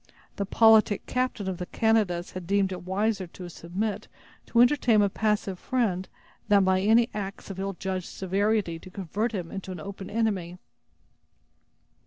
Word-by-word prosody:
The 200 - -2
politic 220 -1 +5
captain 250 -5 -1
of 185 -2 -3
the 180 - -4
Canadas 210 -6 +1
had 185 -2 -7
deemed 195 0 +2
it 185 - -5
wiser 195 +1 -1
to 175 +1 -9
submit 190 +6 -4 0.4
to 235 - +1
entertain 240 -4 +5
a 200 - +2
passive 210 -3 -1
friend, 205 -8 -1 0.4
than 205 -2 +5
by 185 0 +3
any 225 +3 +4
acts 200 -1 -5
of 190 - -7
ill 195 0 -2
judged 185 -1 -4
severity 195 -2 0
to 185 - -12
convert 200 +5 -2
him 180 -6 -5
into 195 -1 -6
an 180 - -6
open 195 +2 -7
enemy. 200 -6 -1
195 Hz, 160 wpm, -27 LUFS, 185-220 Hz, 0.4 s, politic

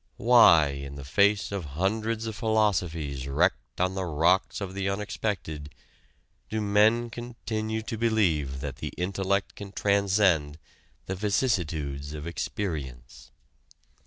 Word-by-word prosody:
Why 100 -11 +6
in 70 0 -6
the 70 - -8
face 100 +8 +2
of 100 -3 -3
hundreds 110 +4 0
of 110 -1 -4
philosophies 85 - 0
wrecked 70 - 0
on 90 +1 +1
the 95 0 -2
rocks 85 +4 +2
of 95 -2 -5
the 100 0 -1
unexpected 95 -7 -4 0.7
do 110 - -2
men 110 +3 +3
continue 110 -2 -4
to 110 - -5
believe 80 - +1
that 70 -3 -5
the - - -5
intellect 95 +2 -1
can 100 -1 -9
transcend 95 -7 +2 0.5
the 95 - -3
vicissitudes 80 - -1
of 75 0 -7
experience? 75 -8 -5
95 Hz, 125 wpm, -27 LUFS, 75-105 Hz, 0.7 s, Why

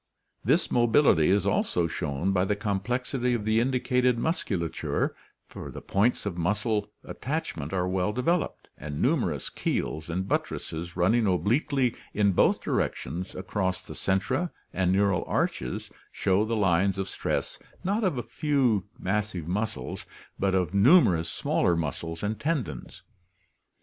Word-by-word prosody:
This - - +2
mobility 120 - +4
is 100 +2 +3
also 85 - +1
shown 80 +2 -1
by 90 -1 +2
the 105 +2 +1
complexity 120 +5 -1
of 105 -3 -3
the 110 +1 +3
indicated 125 0 +2
musculature, 100 - -1 0.3
for - - -8
the - - -7
points 105 +5 +1
of 90 -4 -3
muscle 105 +3 0
attachment 130 - -4
are 90 -1 0
well 90 +2 0
developed 155 +10 -1
and 75 0 -5
numerous - - +1
keels 80 +1 -2
and 95 +3 -2
buttresses 85 -2 -3
running 105 +6 +3
obliquely 120 - +1 0.2
in 100 -1 +4
both 90 - +3
directions 85 +8 -2
across 95 0 -2
the - - -8
centra 105 - 0 0.2
and 90 -1 +1
neural 100 -1 +2
arches 65 -1 -2 0.2
show 95 +3 +2
the 115 +1 -1
lines 95 -1 +2
of 95 0 -2
stress - - -3 0.2
not 205 +5 0
of 135 - -1
few 125 - +1
massive 100 -4 -2
muscles 105 +5 -3 0.3
but 95 -1 +2
of 90 -1 0
numerous 100 - +5
smaller 85 - +1
muscles 80 +1 -3
and 105 +1 -2
tendons. 130 - -3
100 Hz, 135 wpm, -27 LUFS, 90-120 Hz, 0.3 s, numerous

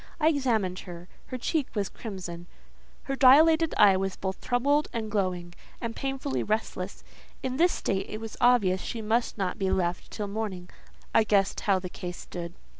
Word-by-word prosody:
I 310 0 +5
examined 225 - 0
her; 175 -1 -9 0.2
her 255 - -4
cheek 290 +3 0
was 200 -2 0
crimson; 180 -6 -7 0.6
her 275 - -2
dilated 315 +5 +6
eye 200 -2 +7
was 195 0 -2
both 190 0 -4
troubled 280 +5 +2
and 220 -2 -4
glowing, 180 -4 -1 0.3
and 230 -1 -4
painfully 270 0 -2
restless: 215 +1 -3 0.4
in 260 -1 -2
this 350 +3 +4
state 195 -1 -1
it 215 - -5
was 225 -1 -7
obvious 210 -7 +4
she 225 -2 -5
must 225 +2 0
not 190 +1 -2
be 190 -1 +1
left 175 -2 -1
till 210 -2 -4
morning. 200 -4 -4 0.4
I 225 - +6
guessed 200 -3 +2
how 195 -2 +2
the 185 0 -4
case 175 -1 -6
stood. 170 0 -7
210 Hz, 175 wpm, -28 LUFS, 185-255 Hz, 0.6 s, eye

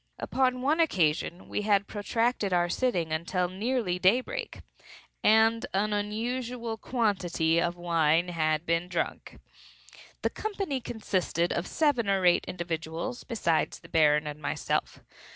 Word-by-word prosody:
Upon 255 -1 0
one 300 +5 +2
occasion 170 - +1
we - - -2
had 205 -1 +2
protracted 220 0 -1
our 175 0 +2
sitting 175 -9 0
until 180 +3 0
nearly 205 -1 -1
daybreak, 255 - +1 0.6
and 225 +1 +4
an 210 +2 +1
unusual 230 +3 -3
quantity 180 -9 0
of 175 0 -1
wine 170 0 +2
had 155 -1 0
been 170 +1 0
drunk. 175 -2 -4 0.8
The - - +1
company 395 -11 -3
consisted 185 -7 -1
of 170 - -2
seven 275 -9 +1
or 195 -2 +2
eight 175 0 +4
individuals 170 +6 -4
besides 170 -8 0
the - - -16
Baron 150 -1 +4
and 150 0 -6
myself. - - -2
195 Hz, 130 wpm, -28 LUFS, 170-235 Hz, 0.8 s, and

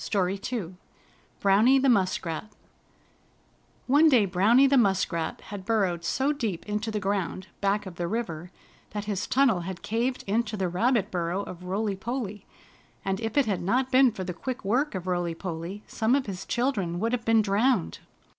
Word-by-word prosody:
STORY 195 -1 0
II 195 -8 -3 0.7
BROWNY 210 +7 +5
THE 270 +1 +2
MUSKRAT 185 -6 +1 1.4
One 295 +5 +5
day 245 -7 +5
Browny 205 +8 +4
the 275 0 +4
Muskrat 190 -7 +1
had 200 -2 -6
burrowed 190 -5 0
so 270 - +1
deep 220 - -3
into 210 +1 -2
the 215 -1 -2
ground 195 -2 -2 0.2
back 200 +1 +1
of 180 -3 -9
the 175 - -2
river 180 -6 -4 0.4
that 210 0 -4
his 205 -2 -2
tunnel 255 -7 +3
had 175 0 -6
caved 240 +4 -1
into 215 +1 -1
the 190 -2 0
rabbit 225 +4 +1
burrow 175 +2 -1
of 180 -1 -9
Rolly 200 +2 -1
Polly, 210 -1 -5 0.6
and 195 0 -1
if 225 +3 -3
it 285 - +5
had 200 -4 -1
not 250 +8 0
been 260 -1 +6
for 190 - -6
the 180 0 -4
quick 250 +6 -5
work 250 +6 +1
of 185 -1 -4
Rolly 175 -2 -1
Polly 175 +3 -6
some 225 +4 +1
of 275 -2 0
his 190 -3 -6
children 205 -9 -1
would 225 +4 0
have 240 -2 -1
been 225 -1 +4
drowned. 215 +6 +1
205 Hz, 175 wpm, -27 LUFS, 185-235 Hz, 1.4 s, been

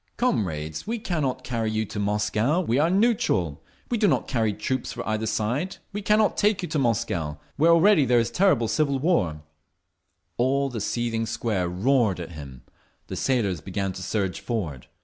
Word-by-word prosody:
"Comrades, 80 - -1
we 230 +2 -1
cannot 150 - -2
carry 115 -3 -2
you 110 0 -1
to 105 - -6
Moscow. 105 - +1
We 140 -8 +1
are 160 +3 +3
neutral. 195 - +1 0.3
We 235 - +1
do 210 - +4
not - - +1
carry 115 -5 +1
troops 115 +5 -3
for - - -6
either 110 0 -1
side. 125 - -1 0.2
We 205 - -3
cannot 210 +1 +2
take 205 -2 +2
you - - -2
to 155 - 0
Moscow, 85 - -1 0.2
where 160 +3 +3
already 170 -1 +5
there 125 -1 +3
is 115 -1 +1
terrible 175 - +3
civil 140 +2 +1
war…." 110 - 0 0.9
All 135 +2 +1
the 115 -3 -4
seething 115 +1 -1
Square 95 -8 -1
roared 105 +1 +2
at 85 - -6
him; 70 -6 -10 0.5
the - - -4
sailors 105 - 0
began 95 +3 -3
to - - -8
surge 95 -4 -2
forward. 85 - -4
115 Hz, 175 wpm, -25 LUFS, 100-155 Hz, 0.9 s, already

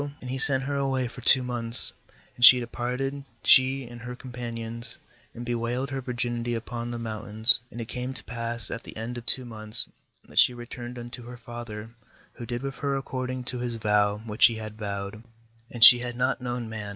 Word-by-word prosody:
And 125 - -8
he 135 - -4
sent 135 0 +2
her 140 +1 -4
away 135 -2 -1
for 125 +2 -12
two 130 +1 +5
months; 120 -1 +4 0.4
and 120 - -5
she 125 0 +9
departed, 125 +4 -5 0.2
she 130 0 +3
and 120 0 -12
her 125 +1 -8
com 125 0 -12
panions, 115 -1 -7 0.4
and 120 - -8
bewailed 120 +2 -3
her 135 0 -4
virginity 120 -1 -4
upon 120 +1 -6
the 120 - -5
mountains. 110 0 +1
39And 120 - -10
it - - -5
came 125 +2 -6
to - - +9
pass 115 -1 +2
at 115 - -5
the - - -12
end 120 +2 -6
of 120 - -16
two 130 -1 +5
months,, 110 -2 +6 0.4
that - - -1
she 125 - +4
returned 120 0 -9
unto 120 0 -8
her 125 - -10
father, 115 -2 -9 0.4
who 120 - -10
did 120 +1 -5
with 135 0 -6
her 140 -2 -2
according 130 -1 -5
to 125 0 -5
his 120 -1 -4
vow 105 -2 0
which 105 -1 +3
he 115 - -4
had 110 -1 -8
vowed; 100 0 -6 0.5
and 120 -1 +6
she 125 - +9
had 120 0 -6
not 125 +2 -1
known 120 -1 -5
man. 110 -2 -7
120 Hz, 205 wpm, -25 LUFS, 115-125 Hz, 0.5 s, she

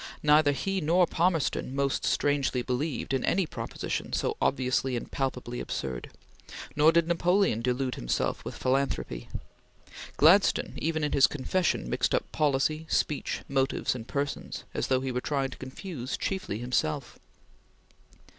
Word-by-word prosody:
Neither 150 0 +5
he 195 +6 -1
nor 170 +4 +4
Palmerston 165 -6 0
"most 140 -1 0
strangely 140 -3 +1
believed" 135 +2 -2
in 135 - 0
any 190 0 +2
proposition - - -4
so - - 0
obviously 130 0 +1
and 120 - -5
palpably 125 -3 -3
absurd, 65 -3 -4 0.7
nor 155 +2 +6
did 170 0 +3
Napoleon 175 - +2
delude 125 +1 0
himself - - -1
with - - -6
philanthropy. 130 - -1 0.9
Gladstone, - - +5
even 160 0 -1
in 150 - 0
his 140 - +6
confession, 175 +6 0
mixed - - +1
up - - -2
policy, 155 +2 +1
speech, 150 - 0
motives, 135 0 0
and 120 -2 -7
persons, 140 0 -3
as - - -1
though 130 -1 +2
he 135 0 -2
were 125 0 -2
trying 135 -2 -1
to - - -9
confuse 130 0 -5
chiefly 190 - -3
himself. 120 -9 -2
140 Hz, 140 wpm, -28 LUFS, 130-160 Hz, 0.9 s, nor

